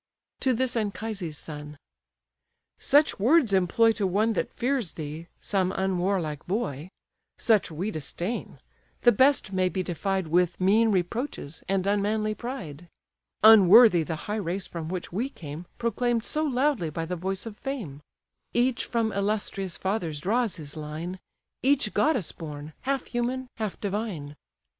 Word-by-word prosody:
To 260 Hz, -, +2 dB
this 250 Hz, +1 st, 0 dB
Anchises' 205 Hz, -6 st, -3 dB
son: 150 Hz, -1 st, -7 dB, 1.0 s
"Such 290 Hz, -3 st, +3 dB
words 245 Hz, 0 st, +4 dB
employ 195 Hz, +5 st, +4 dB
To 210 Hz, -3 st, 0 dB
one 215 Hz, +5 st, +2 dB
that -, -, -2 dB
fears 250 Hz, -, -1 dB
thee, 155 Hz, +2 st, -6 dB
some 190 Hz, -2 st, 0 dB
unwarlike 185 Hz, -5 st, -1 dB
boy; 180 Hz, -, -2 dB, 0.5 s
Such 220 Hz, -5 st, +3 dB
we 175 Hz, +7 st, -3 dB
disdain; 175 Hz, +7 st, -4 dB, 0.5 s
the 240 Hz, -, +7 dB
best 260 Hz, -3 st, +3 dB
may 185 Hz, -1 st, +2 dB
be 185 Hz, 0 st, -2 dB
defied 190 Hz, +2 st, -1 dB
With 175 Hz, +2 st, +1 dB
mean 210 Hz, +5 st, +4 dB
reproaches, 185 Hz, -, -3 dB
and 190 Hz, -1 st, +1 dB
unmanly 210 Hz, +2 st, +1 dB
pride; 175 Hz, -, -7 dB, 0.5 s
Unworthy 215 Hz, -2 st, +8 dB
the 160 Hz, +1 st, -3 dB
high 210 Hz, +1 st, -2 dB
race 185 Hz, +1 st, -2 dB
from 165 Hz, -2 st, -6 dB
which 180 Hz, -1 st, -5 dB
we 235 Hz, +8 st, -1 dB
came 160 Hz, -, -8 dB
Proclaim'd 235 Hz, 0 st, 0 dB
so 305 Hz, +5 st, -1 dB
loudly 260 Hz, -, +1 dB
by 165 Hz, +2 st, -3 dB
the 180 Hz, +2 st, -3 dB
voice 190 Hz, +4 st, -3 dB
of 225 Hz, -2 st, -7 dB
fame: 210 Hz, -, -5 dB, 0.5 s
Each 245 Hz, 0 st, +2 dB
from 230 Hz, -2 st, 0 dB
illustrious 200 Hz, -2 st, -1 dB
fathers 180 Hz, -6 st, -2 dB
draws 220 Hz, +4 st, +1 dB
his 150 Hz, -3 st, -7 dB
line; 155 Hz, +4 st, -5 dB, 0.4 s
Each 280 Hz, +1 st, +2 dB
goddess 295 Hz, -, +2 dB
born; 150 Hz, -1 st, -8 dB
half 270 Hz, 0 st, -1 dB
human, 250 Hz, +1 st, -2 dB
half 215 Hz, -4 st, -3 dB
divine. 195 Hz, -8 st, -3 dB
195 Hz, 145 wpm, -27 LUFS, 170-230 Hz, 1.0 s, Unworthy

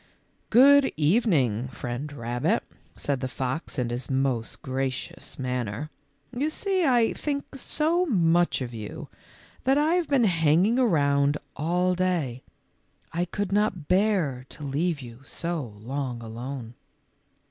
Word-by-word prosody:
" -, -, -41 dB
Good 280 Hz, +3 st, +7 dB
evening, 150 Hz, -, +2 dB
Friend 125 Hz, +4 st, -5 dB
Rabbit," 125 Hz, -, -1 dB, 0.3 s
said 140 Hz, -2 st, -2 dB
the 130 Hz, -, -2 dB
fox 130 Hz, +5 st, -4 dB
in 120 Hz, -2 st, -1 dB
his 120 Hz, +1 st, -3 dB
most 130 Hz, -4 st, -1 dB
gracious 130 Hz, -1 st, -3 dB
manner; 125 Hz, +2 st, -3 dB, 0.2 s
" 250 Hz, -, -21 dB
you 285 Hz, +5 st, 0 dB
see 380 Hz, +3 st, 0 dB
I 240 Hz, -3 st, +4 dB
think 280 Hz, -2 st, -3 dB
so 320 Hz, +6 st, 0 dB
much 175 Hz, -, +3 dB
of 120 Hz, -1 st, -6 dB
you 110 Hz, -2 st, -7 dB, 0.5 s
that 270 Hz, +2 st, +3 dB
I 305 Hz, +3 st, +3 dB
have 355 Hz, -3 st, +1 dB
been 275 Hz, -4 st, +3 dB
hanging 175 Hz, -, +3 dB
around 145 Hz, -, +3 dB, 0.2 s
all 180 Hz, +5 st, +1 dB
day. 175 Hz, -9 st, -1 dB, 0.7 s
I 175 Hz, +1 st, 0 dB
could 200 Hz, +2 st, -3 dB
not 195 Hz, -6 st, +1 dB
bear 180 Hz, -10 st, +2 dB
to 150 Hz, -, -10 dB
leave 145 Hz, +3 st, -1 dB
you 120 Hz, -1 st, -10 dB
so 155 Hz, -6 st, -4 dB
long 125 Hz, +1 st, -4 dB
alone." 120 Hz, +1 st, -6 dB
150 Hz, 135 wpm, -26 LUFS, 130-210 Hz, 0.7 s, Good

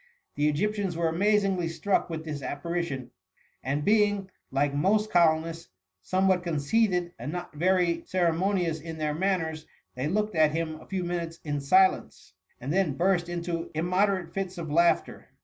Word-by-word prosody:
The 145 Hz, +1 st, +1 dB
Egyptians 195 Hz, +2 st, -1 dB
were 170 Hz, -1 st, +1 dB
amazingly 195 Hz, 0 st, +1 dB
strucjc 165 Hz, +5 st, 0 dB
with 160 Hz, -1 st, -5 dB
this 150 Hz, -3 st, -5 dB
apparition, 145 Hz, -1 st, -4 dB, 0.5 s
and 140 Hz, +3 st, -1 dB
being, 205 Hz, -2 st, +2 dB, 0.2 s
like 140 Hz, +1 st, 0 dB
most 210 Hz, +8 st, +1 dB
colonists, 165 Hz, -1 st, +2 dB, 0.3 s
somewhat 185 Hz, -, +2 dB
conceited 175 Hz, +3 st, +1 dB
and 125 Hz, +6 st, -4 dB
not 175 Hz, -1 st, -6 dB
very 175 Hz, +1 st, +2 dB
ceremonious 175 Hz, -1 st, +1 dB
in 165 Hz, 0 st, -7 dB
their 150 Hz, -1 st, -1 dB
manners, 160 Hz, -3 st, -1 dB, 0.3 s
they 130 Hz, +3 st, -3 dB
looked 210 Hz, +5 st, 0 dB
at 155 Hz, -2 st, +3 dB
him 160 Hz, -1 st, -3 dB
a -, -, -15 dB
few 190 Hz, -2 st, -2 dB
minutes 170 Hz, -1 st, -4 dB
in 145 Hz, -2 st, -2 dB
silence, 185 Hz, +7 st, +2 dB, 0.3 s
and 135 Hz, +5 st, -3 dB
then 180 Hz, -7 st, +1 dB
burst 175 Hz, -1 st, +1 dB
into 170 Hz, -1 st, -3 dB
immoderate 180 Hz, +1 st, +1 dB
fits 190 Hz, -1 st, -4 dB
of 160 Hz, -3 st, -5 dB
laughter. 170 Hz, +2 st, +2 dB
170 Hz, 150 wpm, -27 LUFS, 155-190 Hz, 0.5 s, at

